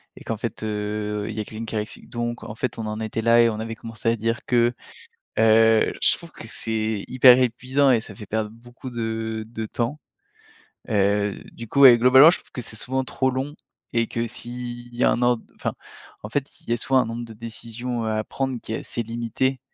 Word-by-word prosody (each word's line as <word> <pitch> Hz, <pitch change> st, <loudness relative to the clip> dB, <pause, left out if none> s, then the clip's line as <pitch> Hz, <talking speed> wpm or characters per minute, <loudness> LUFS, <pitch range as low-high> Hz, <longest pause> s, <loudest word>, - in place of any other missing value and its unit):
et -, -, -12 dB
qu'en 115 Hz, -, -3 dB
fait, 115 Hz, 0 st, -5 dB
heu, 105 Hz, 0 st, -2 dB
il 110 Hz, -, -5 dB
y -, -, -4 dB
a -, -, -3 dB
quelqu'un 110 Hz, +2 st, -7 dB
qui 115 Hz, -, -5 dB
arrive, 105 Hz, 0 st, -5 dB
donc 120 Hz, 0 st, -3 dB
en -, -, -7 dB
fait: 120 Hz, 0 st, -3 dB
«on 110 Hz, -, -3 dB
en 110 Hz, +1 st, -4 dB
était 110 Hz, 0 st, -3 dB
là 115 Hz, +1 st, +5 dB
et 115 Hz, -, +5 dB
on 110 Hz, -1 st, -4 dB
avait 115 Hz, 0 st, -4 dB
commencé 115 Hz, +1 st, -3 dB
à 115 Hz, -, +2 dB
dire 115 Hz, +1 st, -2 dB
que», 120 Hz, -1 st, +3 dB, 0.7 s
heu, 110 Hz, 0 st, +5 dB
je -, -, +5 dB
trouve 170 Hz, -1 st, -11 dB
que 115 Hz, -, -10 dB
c'est 110 Hz, -2 st, -2 dB
hyper 125 Hz, 0 st, +7 dB
épuisant 130 Hz, +3 st, +2 dB
et 120 Hz, -3 st, +4 dB
ça -, -, -10 dB
fait 105 Hz, -, -10 dB
perdre 110 Hz, +1 st, -2 dB
beaucoup 120 Hz, +3 st, -11 dB
de 110 Hz, -1 st, -3 dB
de 110 Hz, -1 st, -5 dB
temps, 120 Hz, +7 st, -2 dB, 0.9 s
heu, 100 Hz, -1 st, +2 dB, 0.2 s
du 115 Hz, -, -8 dB
coup, 140 Hz, -, 0 dB
ouais, 125 Hz, -4 st, +10 dB
globalement 130 Hz, +6 st, +8 dB
je -, -, 0 dB
trouve -, -, -21 dB
que 125 Hz, -, -5 dB
c'est 110 Hz, -, -8 dB
souvent 130 Hz, +4 st, -1 dB
trop 130 Hz, 0 st, 0 dB
long 135 Hz, +3 st, -3 dB, 0.4 s
et 115 Hz, -1 st, +2 dB
que 115 Hz, 0 st, -2 dB
s'il 120 Hz, 0 st, -7 dB
y 120 Hz, -, -2 dB
a -, -, +5 dB
un 120 Hz, -, 0 dB
ordre, 120 Hz, -2 st, +2 dB
enfin, -, -, -3 dB, 0.5 s
en 105 Hz, -, -6 dB
fait, 140 Hz, +4 st, -3 dB
il -, -, -11 dB
y -, -, +3 dB
a -, -, 0 dB
souvent 130 Hz, +2 st, +3 dB
un 125 Hz, -, 0 dB
nombre 115 Hz, +1 st, -5 dB
de 115 Hz, -, -10 dB
décisions, 115 Hz, +2 st, -5 dB
heu, -, -, 0 dB
à 110 Hz, 0 st, 0 dB
prendre 135 Hz, -2 st, -3 dB
qui 110 Hz, -, -7 dB
est -, -, -1 dB
assez 120 Hz, -, -3 dB
limité, 120 Hz, +3 st, -2 dB
115 Hz, 230 wpm, -24 LUFS, 110-125 Hz, 0.9 s, ouais